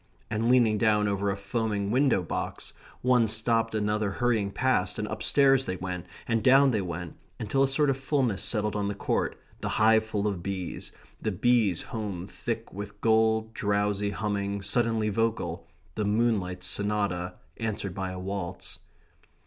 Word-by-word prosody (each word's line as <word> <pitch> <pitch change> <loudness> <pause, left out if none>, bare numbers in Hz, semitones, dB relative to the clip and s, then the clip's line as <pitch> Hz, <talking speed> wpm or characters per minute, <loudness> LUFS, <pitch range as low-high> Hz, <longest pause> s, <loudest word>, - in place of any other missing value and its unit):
And 110 +2 0
leaning 115 -4 +4
down 105 -2 +3
over 100 0 0
a 100 - -1
foaming 100 -1 -2
window 130 -6 +3
box, - - -4 0.3
one 125 -2 +4
stopped 115 +1 +1
another 105 -1 0
hurrying 115 -4 +1
past, 100 -5 0
and 105 - -2
upstairs 135 +1 +3
they 95 - -2
went 90 -1 -5 0.2
and 115 -2 +1
down 135 +1 +6
they 110 -4 +1
went, 90 -1 -6 0.2
until 110 +6 0
a 135 - +5
sort 145 +2 +2
of 135 -1 +1
fulness 135 -7 0
settled 105 -2 0
on 100 -1 0
the 100 - -2
court, - - -1 0.2
the - - -3
hive 110 0 +4
full 105 -2 -2
of 100 -4 -2
bees, 95 -1 -5 0.3
the 110 - -1
bees 110 -3 +2
home 100 -6 -5
thick - - -5
with 100 +1 -7
gold, 110 0 +2
drowsy, 105 -1 0
humming, 100 +1 -2
suddenly 110 +1 +1
vocal; 115 +2 -1 0.3
the 105 - -2
Moonlight 105 -4 0
Sonata 100 -4 -1 0.2
answered 105 -4 -3
by 95 0 -3
a 95 - -6
waltz. 95 -1 -5
105 Hz, 160 wpm, -28 LUFS, 100-115 Hz, 0.3 s, down